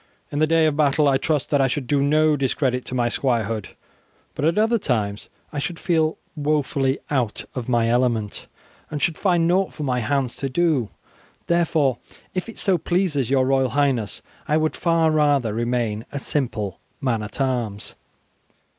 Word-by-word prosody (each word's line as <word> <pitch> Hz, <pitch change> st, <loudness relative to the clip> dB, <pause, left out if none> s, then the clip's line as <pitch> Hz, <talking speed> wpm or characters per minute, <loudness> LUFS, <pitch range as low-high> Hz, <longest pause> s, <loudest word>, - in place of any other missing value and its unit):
In 145 Hz, -, -2 dB
the 155 Hz, -, +4 dB
day 165 Hz, 0 st, +4 dB
of 155 Hz, -2 st, +2 dB
battle 150 Hz, 0 st, +3 dB
I 135 Hz, -1 st, +4 dB
trust 150 Hz, -2 st, -1 dB
that 145 Hz, -2 st, +3 dB
I 135 Hz, -, +4 dB
should 130 Hz, +1 st, -2 dB
do 140 Hz, +2 st, +1 dB
no 155 Hz, +2 st, +3 dB
discredit 130 Hz, -2 st, 0 dB
to 130 Hz, -, -5 dB
my 120 Hz, -1 st, +2 dB
squirehood, 115 Hz, -4 st, -1 dB, 0.6 s
but -, -, -4 dB
at 165 Hz, +4 st, +2 dB
other 225 Hz, +2 st, +3 dB
times 105 Hz, -, -2 dB, 0.2 s
I 145 Hz, -, -2 dB
should 175 Hz, +4 st, -3 dB
feel 160 Hz, -3 st, +1 dB, 0.2 s
woefully 145 Hz, -3 st, 0 dB
out 125 Hz, -7 st, -1 dB
of 125 Hz, -2 st, -5 dB
my 120 Hz, -2 st, +2 dB
element, 120 Hz, -3 st, 0 dB, 0.4 s
and 150 Hz, -, -4 dB
should 165 Hz, +2 st, +1 dB
find 175 Hz, -3 st, +2 dB
nought 185 Hz, +2 st, +2 dB
for 150 Hz, -, -6 dB
my 125 Hz, -3 st, 0 dB
hands 135 Hz, 0 st, -1 dB
to 135 Hz, -, -3 dB
do, 145 Hz, -5 st, +1 dB, 0.6 s
therefore 160 Hz, -6 st, +2 dB, 0.3 s
if 185 Hz, +4 st, -3 dB
it 225 Hz, -, -10 dB
so 190 Hz, -4 st, +2 dB
pleases 165 Hz, -8 st, 0 dB
your 130 Hz, -1 st, +3 dB
Royal 135 Hz, -1 st, +2 dB
Highness, 130 Hz, -6 st, 0 dB, 0.2 s
I 150 Hz, 0 st, +3 dB
would 155 Hz, 0 st, 0 dB
far 165 Hz, -2 st, +2 dB
rather 145 Hz, -7 st, +2 dB
remain 115 Hz, -2 st, -1 dB
a -, -, -4 dB
simple 115 Hz, -, -2 dB, 0.2 s
man 125 Hz, -6 st, 0 dB
at 105 Hz, +5 st, -7 dB
arms." 120 Hz, -6 st, -2 dB
140 Hz, 175 wpm, -23 LUFS, 125-155 Hz, 0.6 s, the